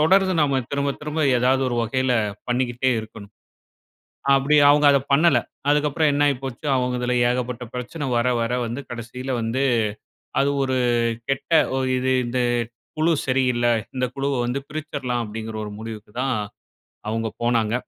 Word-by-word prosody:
தொடர்ந்து 190 +4 +4
நாம 140 -3 +2
திரும்ப 140 0 0
திரும்ப 150 +1 -3 0.2
ஏதாவது 130 +2 +2
ஒரு 120 - -2
வகையில 130 +2 0 0.4
பண்ணிக்கிட்டே 125 +1 0
இருக்கணும். 110 -2 -11 1.0
அப்பிடி 140 +2 +4
அவங்க 145 0 +5
அத 140 - +5
பண்ணல. 145 -2 +5 0.3
அதுக்கப்பறம் 150 +1 +2
என்னாயி 145 -1 +3
போச்சு, 130 +2 -6
அவங்க 125 -1 0
இதுல 125 0 0 0.2
ஏகப்பட்ட 125 0 -2
பிரச்சன 130 +4 -4
வர 120 +1 +2
வர 115 +1 -1
வந்து 120 +4 -4
கடைசியில 125 +2 -6
வந்து, 115 +4 -1 0.8
"அது 140 +1 +2
ஒரு 130 -1 0 0.5
கெட்ட 135 +3 -2 0.3
ஒ - - +1 0.2
இது 130 +1 +1
இந்த 125 +1 -1 0.6
குழு 165 +2 +3
சரி 130 0 +2
இல்ல. 120 0 +1 0.3
இந்த 125 - +1
குழுவை 135 -1 -1
வந்து 130 +3 -2
பிரிச்சிரலாம்" 140 -5 -3
அப்டீங்குற 110 +1 -6
ஒரு 105 - -7
முடிவுக்கு 110 -2 -8
தான் 135 -1 0 0.8
அவங்க 115 0 -1
போனாங்க. 115 -2 +1
130 Hz, 150 wpm, -23 LUFS, 120-140 Hz, 1.0 s, அவங்க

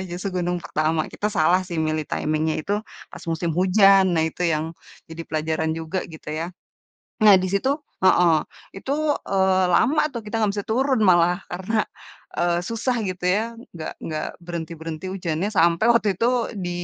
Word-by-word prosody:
justru 185 0 -3
gunung 175 0 -2
pertama, 155 +1 -1
kita 210 - -2
salah 180 -3 +3
sih 175 - -5
milih 155 -1 -1
timing-nya 155 +1 -1
itu 200 - -4 0.4
pas - - -10
musim 165 +1 -1
hujan 195 +1 +6
nah 160 - +2
itu 160 +2 -1
yang 160 0 -1 0.4
jadi 165 +1 -6
pelajaran 160 0 -1
juga 165 +3 -3
gitu 160 -2 -10
ya. 160 +2 -3 0.8
Nah 205 -3 +8
di 185 - -1
situ 200 +8 0 0.3
heeh 180 -2 +5 0.4
itu, 265 +8 -4 0.4
eee, 190 -1 +3
lama 270 - +3
tuh 235 - -4
kita 210 - -8
gak 210 - +3
bisa 200 - -4
turun 260 +3 +1
malah 175 -1 +4
karena, 195 +5 -1 0.5
eee, 175 0 +2
susah 230 +2 -1
gitu 185 0 -6
ya, 215 - +1 0.3
enggak 160 -2 -6
enggak 155 -1 -3 0.2
berhenti 170 -1 -5
berhenti 160 +2 -6
hujannya 170 -1 -2
sampai 170 +5 +4
waktu 225 -3 +2
itu 230 - +2 0.3
di 180 -2 -3
175 Hz, 165 wpm, -23 LUFS, 160-195 Hz, 0.8 s, Nah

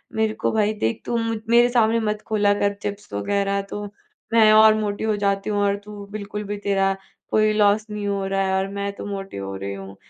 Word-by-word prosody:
मेरे 220 0 +1
को - - -1
भाई 215 -1 +1
देख 115 +1 0
तू 235 - -1
मु 230 0 -1
मेरे 240 +1 +5
सामने 230 -1 +3
मत 210 -1 -2
खोला 205 -2 +3
कर 200 0 +1
चिप्स 205 - -6
वगैरह, 200 - 0
तो 205 +1 -6 0.5
मैं 220 -2 +6
और 215 0 +8
मोटी 205 -1 -2
हो 220 -1 +1
जाती 200 +1 0
हूँ 205 -1 0
और 200 0 +2
तू 205 -1 -9
बिल्कुल 210 0 -5
भी 205 0 -4
तेरा 195 -1 +1 0.3
कोई 215 0 +3
लॉस 210 0 +3
नहीं 210 -1 -4
हो 200 -1 -1
रहा 195 0 0
है 190 - 0
और 190 - 0
मैं 200 0 -2
तो - - -7
मोटी 195 - -6
हो 95 0 -5
रही 100 +1 -5
हूँ। 95 0 -9
205 Hz, 225 wpm, -23 LUFS, 195-215 Hz, 0.5 s, और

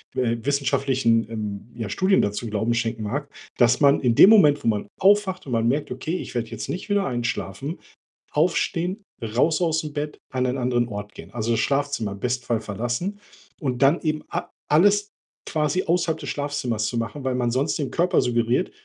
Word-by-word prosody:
äh, 120 -2 +1
wissenschaftlichen, 130 -4 +1
ähm, 105 0 -5
ja, 115 -3 -4
Studien 190 - +2
dazu 105 +3 -2
Glauben 110 +3 0
schenken 115 -1 -2
mag, 140 +7 -3 0.3
dass 120 -1 +4
man 140 -1 +5
in 120 -3 +2
dem 200 - +9
Moment, 150 -9 +6
wo - - -1
man 105 -2 0
aufwacht 195 -2 +3
und 130 - -7
man 115 0 +1
merkt, 140 +3 0
„Okay, 155 +7 -3
ich - - -7
werde 120 -2 -2
jetzt 110 -2 -6
nicht 185 +4 -5
wieder 200 -1 +2
einschlafen“ 120 - -3 0.5
aufstehen, 175 +4 0 0.2
raus 125 +10 +1
aus'm 160 -3 0
Bett, 150 0 -4
an 130 -1 0
einen 125 +2 -1
anderen 120 -1 +1
Ort 105 -1 -7
gehen. 85 - -11
Also, 115 0 -2
das 115 - +2
Schlafzimmer 140 -7 0
im 100 - -10
besten 125 +1 -2
Fall 115 -2 0
verlassen 120 - -3 0.4
und 130 -5 -2
dann 145 +6 +4
eben 155 -1 -1
a - - -4 0.2
alles 205 +6 +4 0.4
quasi 155 +3 0
außerhalb 170 -1 +1
des - - -6
Schlafzimmers 140 -7 -2
zu 120 - -3
machen, 115 +5 -4
weil 130 -1 0
man 120 -2 0
sonst 135 +5 0
dem 140 -3 -3
Körper 175 +1 +2
suggeriert: 120 0 +1
130 Hz, 190 wpm, -24 LUFS, 115-155 Hz, 0.5 s, dem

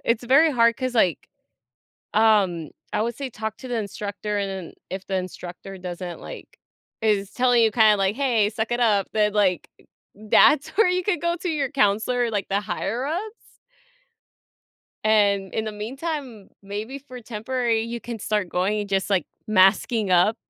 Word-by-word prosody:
it's 230 +1 0
very 280 +6 +5
hard 235 -4 +3
'cause, 255 -2 -3
like 185 -7 +1 0.9
um, 195 -8 +3 0.2
I - - 0
would 235 +1 -2
say 275 -2 -5
talk 220 -1 -5
to 260 - -9
the 240 - -1
instructor, 205 0 -4
and 200 -1 -1 0.2
then, - - -15 0.2
if 190 +1 -6
the 190 - -2
instructor 185 +1 -6
doesn't, 180 -1 -6
like - - -10 0.4
is 205 -2 +1
telling 245 -1 +3
you, 220 - +3
kinda 220 -2 +5
like, 195 +2 +1
"Hey, 235 -7 +2
suck 220 +1 -3
it 240 - 0
up." 210 -5 +2
Then, 210 -1 +2
like 195 -4 +1 0.5
that's 275 +8 +4
where 405 0 +3
you 360 0 0
could 415 -3 0
go 340 0 0
to 360 - -2
your 285 -4 -1
counselor, 240 0 +1
like, 205 -2 -2
the 200 +1 +1
higher 225 +4 -3
ups? 340 +7 -1 1.8
And, 200 -3 +2
in 220 - -1
the 215 - -4
meantime, 250 - -5
maybe 210 +7 -6
for 255 -3 -11
temporary, 230 +1 -1
you 235 0 -5
can 235 -1 -6
start 210 -3 -1
going, 195 +5 0
and, 205 - -5
just, 195 -1 0
like, 185 -5 +1 0.2
masking 205 +1 +3
up. 180 +5 +4
220 Hz, 175 wpm, -24 LUFS, 200-245 Hz, 1.8 s, very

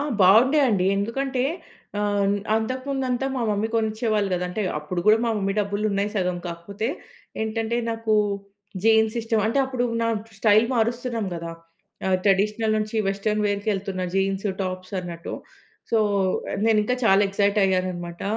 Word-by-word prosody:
ఆ! - - 0 0.2
బాగుండే 245 +11 +6
అండి. 190 -4 +2
ఎందుకంటే 255 +5 -1 0.6
ఆహ్, 205 -1 +1 0.2
అంతకు 255 +4 -2
ముందు 270 -1 -1
అంతా 250 +2 0
మా 255 - -2
మమ్మీ 210 +2 0
కొనిచ్చేవాళ్ళు 220 -2 0
కదా! 180 0 -1
అంటే, 195 +4 -4 0.2
అప్పుడు 150 +4 -4
కూడా 215 - +7
మా 230 - +1
మమ్మీ 195 -1 0
డబ్బులున్నాయి 205 0 0
సగం. 180 -3 0
కాకపోతే 195 +6 -5 0.6
ఏంటంటే, 225 +1 -1
నాకు 225 -1 -1 0.7
జీన్స్ 220 0 +4
ఇష్టం 225 -1 0
అంటే, 230 +5 +1
అప్పుడు 255 -2 -2 0.2
నా 230 - +1 0.3
స్టైల్ 215 +1 +5
మారుస్తున్నాం 235 -1 -1
కదా! 170 0 -5 0.6
ఆ! - - +1 0.2
ట్రెడిషనల్ 210 +3 +2
నుంచి 215 +1 -3
వెస్టర్న్ 210 +2 0
వేర్‌కి 205 +1 -1
ఎళ్తున్న 190 -1 -3
జీన్స్, 195 +1 0 0.2
టాప్స్ 185 0 -5
అన్నట్టు. 170 -1 -6 0.6
సో, 225 - +3 0.5
ఆహ్, - - -3
నేనింకా 220 +2 +2
చాలా 195 -2 +5
ఎక్సైట్ 200 +1 +1
అయ్యాను 185 -1 +1
అన్నమాట. 175 0 -7
210 Hz, 150 wpm, -24 LUFS, 195-225 Hz, 0.7 s, కూడా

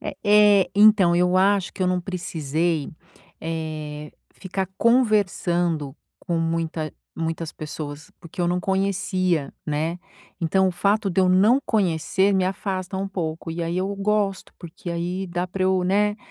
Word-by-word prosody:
É - - -5
é, 205 -2 +5
então, 205 -4 +6
eu 180 +1 +3
acho 195 -1 +2
que - - -4
eu 185 - +2
não 180 0 +1
precisei, 165 -4 -2 0.5
eh, 155 -2 -5 0.2
ficar 190 0 -4
conversando 175 - +1 0.2
com 170 -3 -2
muita 165 -2 -2 0.2
muitas 165 0 -3
pessoas, 150 -1 -7
porque 170 +2 -9
eu 175 - +1
não 180 - +1
conhecia, 190 -5 0
né. 155 +4 -1 0.4
Então, 190 +3 +2
o - - 0
fato 200 +3 +1
de 185 - +1
eu 185 - +3
não 200 +8 +5
conhecer 190 -1 +1
me 190 - +2
afasta 190 0 -3
um 195 +1 -2
pouco, 165 -4 -4
e 170 +1 -4
aí 170 +1 -2
eu 195 +2 -2
gosto, 200 -1 -1
porque 175 +1 -8
aí 175 +3 -3
dá 175 +1 -2
pra 185 +1 -4
eu, 185 -1 +2
né, 205 +3 +2
180 Hz, 155 wpm, -23 LUFS, 165-195 Hz, 0.5 s, então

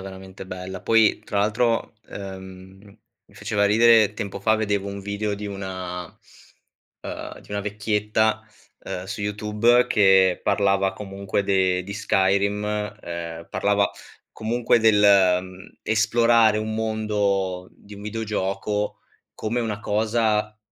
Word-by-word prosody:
veramente 95 0 -10
bella. 95 0 -7
Poi 110 -1 +3
tra 105 -1 -3
l'altro, 115 +3 0 0.2
ehm, 95 -1 -9 0.5
mi - - -24
faceva 100 -1 0
ridere, 110 0 +5
tempo 100 -2 -5
fa 110 +3 +3
vedevo 100 -2 -1
un 100 0 -6
video 100 +1 -3
di 105 +1 -7
una 95 -3 -5
uhm, - - -12
di - - -20
una 100 0 -2
vecchietta, 105 +1 0 0.4
uhm, 90 - -5
su 100 +2 -6
YouTube 105 +4 +2
che 95 -4 +4
parlava 100 -1 +1
comunque 100 0 -3
de 95 -2 +1
di 100 +2 -7
Skyrim, 100 0 +1 0.4
ehm, 85 -1 -7
parlava 100 -1 +1 0.4
comunque 115 +2 +1
del, 110 -2 +4
ehm, 95 -2 +2
esplorare 110 0 +3
un 110 0 -3
mondo 105 -4 -1
di 105 - -18
un 100 - -11
videogioco 105 -1 -3 0.3
come 115 +3 -2
una 110 -3 -3
cosa 105 0 0
100 Hz, 125 wpm, -23 LUFS, 95-110 Hz, 0.5 s, ridere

